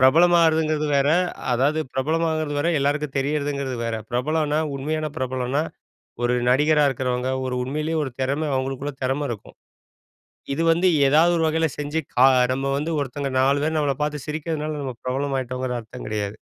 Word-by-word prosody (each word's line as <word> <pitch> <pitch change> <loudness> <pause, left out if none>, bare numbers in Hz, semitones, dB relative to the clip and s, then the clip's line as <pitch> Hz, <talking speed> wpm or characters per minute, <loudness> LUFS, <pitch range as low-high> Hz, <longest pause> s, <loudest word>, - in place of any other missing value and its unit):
பிரபலமாறதுங்கிறது 160 +1 +4
வேற. 140 +1 +3 0.4
அதாவது 140 +6 +2
பிரபலமாகறது 155 +2 0
வேற, 155 +4 +1
எல்லாருக்கும் 145 0 -1
தெரியிறதுங்கிறது 140 -2 -1
வேற. 115 -1 -2
பிரபலம்ன்னா 150 +4 0 0.2
உண்மையான 155 +3 -2
பிரபலம்ன்னா, 130 +2 -1 0.6
ஒரு 120 - +2 0.2
நடிகரா 150 +3 +4
இருக்கிறவங்க, 125 -1 -2 0.2
ஒரு 125 - -2
உண்மையிலயே 155 +5 -2
ஒரு 135 - -4
திறம 140 +4 0
அவங்களுக்குள்ள 135 +2 -3
திறம 135 +3 0
இருக்கும். 110 - -9 1.0
இது 160 +4 -1
வந்து 170 +3 +2 0.2
ஏதாவது 160 +5 +5
ஒரு 165 - +1
வகையில 160 +1 +2
செஞ்சு 150 +2 -2 0.2
கா 130 +2 +6 0.3
நம்ம 135 +1 -1
வந்து 155 +4 -2
ஒருத்தவங்க 140 0 -3
4 140 +2 +3
பேரு 160 +1 0
நம்மள 145 -2 +1
பார்த்து 150 -2 -2
சிரிக்கிறனால 155 0 -3
நம்ம 130 -2 -4
பிரபலமாய்ட்டோங்கிற 130 -1 -2
அர்த்தம் 115 +3 -10
கிடையாது. 105 -1 -3
145 Hz, 145 wpm, -23 LUFS, 130-155 Hz, 1.0 s, கா